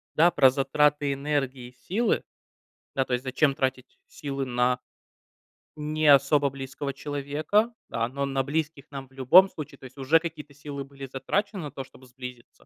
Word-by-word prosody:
да, 170 +3 +6
про 135 -5 +6
затраты 145 +1 +2
энергии 135 -3 -2
и - - -18 0.2
силы. 225 +6 +1 0.7
Да, 135 -1 +2
то - - -3
есть 125 +1 0
зачем 135 +2 +2
тратить 130 -1 -3
силы 140 -2 -4
на 125 0 +1 1.0
не 155 +1 -1
особо 140 0 +5
близкого 135 +1 -5
человека, 150 - 0 0.2
да. 115 0 -1
Но 140 +2 -2
на 135 -1 0
близких 150 0 -2
нам 135 -1 -7
в 130 - -34
любом 155 +9 +7
случае. 150 -3 -8
То - - -12
есть 130 +2 -13
уже 145 +5 +4
какие-то 155 -3 -7
силы 145 -1 -6
были 135 0 -10
затрачены 195 - -2
на 145 - -6
то, 135 0 -6
чтоб 130 0 -18
сблизиться. 125 -1 -11
140 Hz, 170 wpm, -27 LUFS, 130-150 Hz, 1.0 s, любом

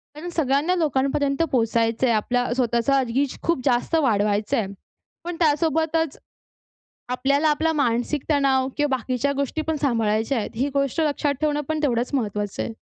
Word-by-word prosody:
कारण 325 +4 -6
सगळ्यांना 310 +1 +1
लोकांपर्यंत 275 -2 0
पोहचायचंय, 230 0 +1
आपल्या 245 +3 +1
स्वतःचा 250 +2 +2
रिच 260 +3 -1
खूप 335 -6 0
जास्त 255 +5 +1
वाढवायचंय. 210 -1 +1 0.6
पण 350 0 -4
त्यासोबतच, 320 0 +1 0.9
आपल्याला 280 +4 +1
आपला 320 +2 +1
मानसिक 255 0 0
तणाव 270 -3 +2
किंवा 290 -3 +1
बाकीच्या 255 +3 -1
गोष्टी 280 +3 -2
पण 320 - +1
सांभाळायच्या 225 -1 +1
आहेत. 215 - -3
ही 260 +5 0
गोष्ट 275 +2 0
लक्षात 290 -2 0
ठेवणं 295 -1 +1
पण 315 -1 -1
तेवढंच 245 -3 0
महत्त्वाचं 210 -5 -2
आहे. 225 - -5
275 Hz, 140 wpm, -23 LUFS, 235-300 Hz, 0.9 s, स्वतःचा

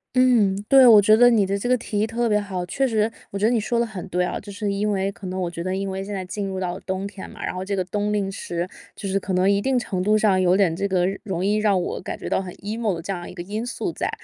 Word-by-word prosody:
嗯， 240 -6 +4
对， 265 -2 +7
我 220 -3 +9
觉 215 +2 +6
得 245 +2 +7
你 220 -4 +3
的 200 +1 -1
这 245 - -2
个 255 - +4
提 210 -3 -3
议 215 - +1
特 235 +1 -1
别 210 -2 +3
好。 190 -3 -4
确 270 +9 0
实 220 -2 +1 0.2
我 200 - -5
觉 200 - +1
得 225 - +4
你 240 - +2
说 235 +2 -1
的 235 - +2
很 210 -6 -7
对 180 +1 0
啊， - - -3
就 200 - -10
是 205 0 -2
因 205 +2 0
为 195 0 0
可 195 -1 -9
能 185 +1 -4
我 175 -2 -2
觉 170 - -6
得 185 +1 -2
因 195 0 -2
为 190 0 -4
现 200 - -7
在 190 -2 -4
进 200 +2 -4
入 190 -1 -4
了 - - -3
到 185 - -7
冬 190 0 -4
天 200 -1 -8
嘛， - - -7
然 - - -3
后 185 0 -4
这 200 +1 -2
个 185 - 0
冬 205 +3 -2
令 200 -2 -1
时 175 -2 -4 0.3
就 200 - -6
是 195 +1 0
可 195 0 -4
能 185 +2 +3
一 200 0 +2
定 265 +3 +1
程 190 -6 -2
度 210 +3 +3
上 200 -3 +3
有 180 0 +4
点 185 -5 +2
这 200 +3 -1
个 185 -2 +1 0.2
容 190 -2 -2
易 205 +2 +2
让 210 -3 +2
我 175 - -3
感 - - -5
觉 - - -7
到 - - +1
很 185 -2 -7
emo 215 0 -2
的 165 - -6
这 195 +4 -4
样 175 -2 -6
一 - - -10
个 175 - -6
因 210 +5 -4
素 245 - -3
在， - - -3
200 Hz, 355 characters per minute, -23 LUFS, 185-215 Hz, 0.3 s, 我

